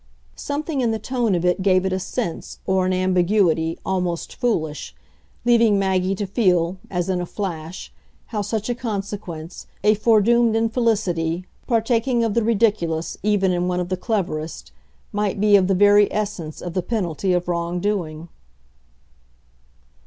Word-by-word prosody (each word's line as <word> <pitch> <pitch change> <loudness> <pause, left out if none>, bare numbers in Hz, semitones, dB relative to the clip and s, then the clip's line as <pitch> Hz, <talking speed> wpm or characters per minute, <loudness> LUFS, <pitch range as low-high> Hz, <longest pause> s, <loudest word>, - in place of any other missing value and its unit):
Something 290 0 -3
in 240 - +2
the 220 - 0
tone 240 -4 0
of 175 0 -1
it 180 +1 +2
gave 185 -1 +3
it 190 - 0
a 185 - 0
sense, 175 -2 -4
or 190 -1 +1
an - - +1
ambiguity, 185 -3 +2
almost 180 -3 -2
foolish 160 - -2 0.5
leaving 230 -3 +4
Maggie 190 -1 +1
to 205 - -3
feel, 185 -4 +1
as 175 -1 -2
in 185 -2 0
a - - -3
flash, 175 -4 -6 0.4
how 210 - 0
such 210 +1 -3
a 245 - 0
consequence, 200 -7 -6 0.2
a 210 +1 +5
foredoomed 225 +2 +3
infelicity, 210 -7 0 0.2
partaking 235 +1 +1
of 225 -2 0
the 235 - +1
ridiculous 205 -8 +1
even 200 -2 +2
in 180 0 0
one 180 0 0
of 180 0 -3
the 185 - 0
cleverest, 175 - -3 0.4
might 205 -1 -1
be 210 0 +5
of 190 -2 +4
the 195 - +2
very 205 +1 +5
essence 195 -7 -4
of 175 - -5
the 185 - 0
penalty 185 -3 -1
of 180 -1 0
wrong 170 0 -1
doing. 175 -5 -2
190 Hz, 155 wpm, -22 LUFS, 175-220 Hz, 0.5 s, a